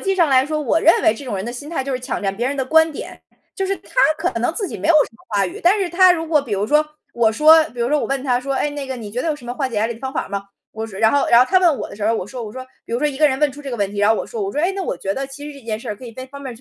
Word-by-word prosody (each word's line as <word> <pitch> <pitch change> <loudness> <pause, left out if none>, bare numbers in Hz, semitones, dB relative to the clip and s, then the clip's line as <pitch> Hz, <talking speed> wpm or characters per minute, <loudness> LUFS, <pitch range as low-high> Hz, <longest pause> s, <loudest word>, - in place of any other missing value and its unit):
辑 390 -1 0
上 345 -4 +3
来 265 -1 +4
说， 305 0 -2
我 300 +2 +1
认 330 - +5
为 215 - +5
这 225 - -9
种 250 - -4
人 190 - -4
的 240 - -5
心 270 +4 -8
态 325 -4 -2
就 275 +1 -4
是 255 - -1
抢 250 - -4
占 195 -1 -2
别 240 +3 -1
人 280 +2 -2
的 265 - -1
观 320 +4 +4
点， - - -8 0.4
就 385 - -1
是 390 +1 -1
他 - - -20 0.2
可 350 +2 -1
能 245 +8 -1
自 405 -1 -3
己 - - -7
没 - - -3
有 335 - +5
什 305 - +4
么 - - -23
话 205 -3 +1
语， 180 - -6
但 370 +5 +4
是 370 -3 -1
他 365 +1 +6
如 325 -1 -3
果 310 -2 +3
比 260 -6 -8
如 200 0 0
说 300 +7 +3 0.3
我 230 -2 +2
说 310 +6 +6
比 245 - -8
如 235 - +1
说 300 +2 +2
我 - - -2
问 275 -1 -2
他 250 -3 +1
说： 275 +2 -3
“哎， 295 - 0
那 290 -1 -6
个 265 - -4
你 220 -4 -8
觉 240 +4 -3
得 - - -3
有 310 - +1
什 280 -4 -13
么 240 - -4
化 265 +1 -2
解 240 - -9
压 215 +2 +1
力 235 - -4
的 225 - -15
方 265 0 -4
法 - - -3
吗？” 200 0 -4 0.3
我 220 0 -5
说 205 -4 -11
然 220 0 +5
后 285 - +2
然 235 - +6
后 - - +6
他 370 - +6
问 340 -6 +3
我 - - -5
的 - - -11
时 210 0 -2
候， 230 - +2
我 220 - -2
说 240 +4 -7
我 210 - -8
说， 260 +2 -7 0.2
比 - - -9
如 235 - +1
说 300 - +2
一 270 -2 -6
个 305 - +5
人 265 - 0
问 300 -2 +3
出 285 +2 -11
这 280 -2 -7
个 - - -2
问 200 -3 -1
题， 205 - -7
然 205 +1 +3
后 220 - +5
我 - - -3
说 460 - -6
我 395 0 -2
说： 295 - -1
“哎， 355 - +2
那 390 - -4
我 - - -3
觉 195 - -3
得 270 +4 -3
其 275 +2 -10
实 280 - -12
这 265 - -18
件 215 -2 -2
事 215 - -4
可 255 - -12
以 235 - -9
在 255 +3 -8
方 280 +2 -11
面 265 -3 -7
265 Hz, 425 characters per minute, -20 LUFS, 230-305 Hz, 0.4 s, 他